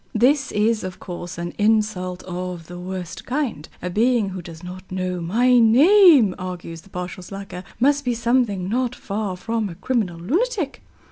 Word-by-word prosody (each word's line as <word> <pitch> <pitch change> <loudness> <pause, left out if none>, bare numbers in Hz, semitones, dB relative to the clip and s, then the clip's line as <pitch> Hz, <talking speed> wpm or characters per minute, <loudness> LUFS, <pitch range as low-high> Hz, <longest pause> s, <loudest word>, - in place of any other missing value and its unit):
This 270 +5 +3
is, 215 +1 +2
of 185 0 -6
course, 175 -1 -7
an 175 0 -4
insult 205 -4 +1
of 180 -2 -5
the 175 +2 -9
worst 180 -1 -6
kind. 250 - -3
"A 180 - -2
being 230 +1 +2
who 185 -1 -6
does 165 0 -11
not 185 +1 -9
know 185 -1 -2
my 240 +8 +4
name," 275 - +7
argues 175 -3 -6
the 195 - -20
partial 180 0 -6
slacker, 195 -1 -8 0.2
"must 285 +3 +3
be 245 -2 0
something 230 -5 +1
not 245 +3 0
far 200 -2 -4
from 225 +1 -2
a 170 - -8
criminal 195 -3 -1
lunatic." 340 - -1
200 Hz, 165 wpm, -22 LUFS, 180-245 Hz, 0.2 s, name